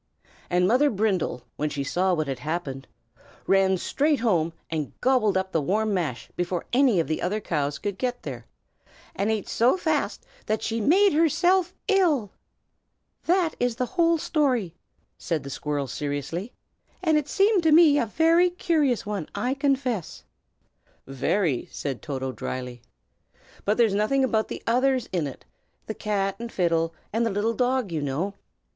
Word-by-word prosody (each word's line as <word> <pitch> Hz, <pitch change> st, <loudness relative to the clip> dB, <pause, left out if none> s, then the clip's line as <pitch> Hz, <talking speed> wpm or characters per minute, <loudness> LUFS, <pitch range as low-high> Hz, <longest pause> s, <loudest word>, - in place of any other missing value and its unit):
And 180 Hz, 0 st, +3 dB
Mother 260 Hz, +7 st, +4 dB
Brindle, 195 Hz, -, -1 dB
when 150 Hz, +1 st, -1 dB
she 140 Hz, -1 st, -3 dB
saw 180 Hz, +6 st, +1 dB
what 155 Hz, -2 st, -2 dB
had 135 Hz, -2 st, -3 dB
happened, 150 Hz, -4 st, -4 dB, 0.6 s
ran 195 Hz, -1 st, +3 dB
straight 290 Hz, -, 0 dB
home 170 Hz, -9 st, +2 dB, 0.2 s
and 155 Hz, -3 st, -4 dB
gobbled 245 Hz, -7 st, +2 dB
up 190 Hz, 0 st, -2 dB
the 160 Hz, -, +1 dB
warm 210 Hz, +8 st, 0 dB
mash 160 Hz, -10 st, -2 dB
before 175 Hz, 0 st, -2 dB
any 250 Hz, -7 st, +4 dB
of 165 Hz, -, 0 dB
the 155 Hz, -, -2 dB
other 200 Hz, +5 st, -1 dB
cows 145 Hz, -7 st, -2 dB
could 200 Hz, -2 st, -4 dB
get 250 Hz, -1 st, -2 dB
there, 120 Hz, -5 st, -7 dB, 0.7 s
and 200 Hz, +3 st, 0 dB
ate 220 Hz, -3 st, -1 dB
so 245 Hz, +10 st, +3 dB
fast 315 Hz, -4 st, -1 dB, 0.2 s
that 215 Hz, -, -1 dB
she 225 Hz, 0 st, -1 dB
made 375 Hz, -, +4 dB
herself 350 Hz, +4 st, +2 dB
ill. 335 Hz, -, +2 dB, 0.9 s
"That 345 Hz, -2 st, +2 dB
is 245 Hz, -2 st, 0 dB
the 250 Hz, +1 st, -1 dB
whole 335 Hz, +2 st, +2 dB
story," 260 Hz, -, 0 dB, 0.5 s
said 160 Hz, -4 st, -2 dB
the 140 Hz, -, -7 dB
squirrel, 145 Hz, 0 st, -2 dB
seriously; 145 Hz, -, -4 dB, 0.5 s
"and 320 Hz, -3 st, +3 dB
it 300 Hz, -2 st, +1 dB
seemed 395 Hz, +2 st, +3 dB
to 320 Hz, -1 st, +3 dB
me 305 Hz, -2 st, +7 dB
a 230 Hz, -, 0 dB
very 330 Hz, -, +4 dB
curious 315 Hz, -, 0 dB
one, 205 Hz, -6 st, -4 dB
I 250 Hz, +2 st, 0 dB
confess." 270 Hz, -, -1 dB, 0.8 s
"Very!" 135 Hz, +2 st, -1 dB
said 135 Hz, -4 st, -4 dB
Toto, 130 Hz, -3 st, -4 dB
dryly. 125 Hz, -1 st, -6 dB, 0.8 s
"But 210 Hz, +2 st, +1 dB
there's 230 Hz, -4 st, +3 dB
nothing 215 Hz, +7 st, +2 dB
about 220 Hz, -4 st, +1 dB
the -, -, -7 dB
others 255 Hz, +1 st, +2 dB
in 170 Hz, -5 st, 0 dB
it, 135 Hz, -, -10 dB, 0.4 s
the 220 Hz, -, -4 dB
cat 200 Hz, -3 st, -1 dB
and 235 Hz, 0 st, -6 dB
fiddle, 165 Hz, -2 st, +1 dB, 0.2 s
and 225 Hz, +2 st, +1 dB
the 230 Hz, -, +1 dB
little 205 Hz, +3 st, 0 dB
dog, 250 Hz, -3 st, 0 dB
you 160 Hz, -2 st, -2 dB
know." 145 Hz, +8 st, -2 dB
210 Hz, 165 wpm, -25 LUFS, 165-270 Hz, 0.9 s, me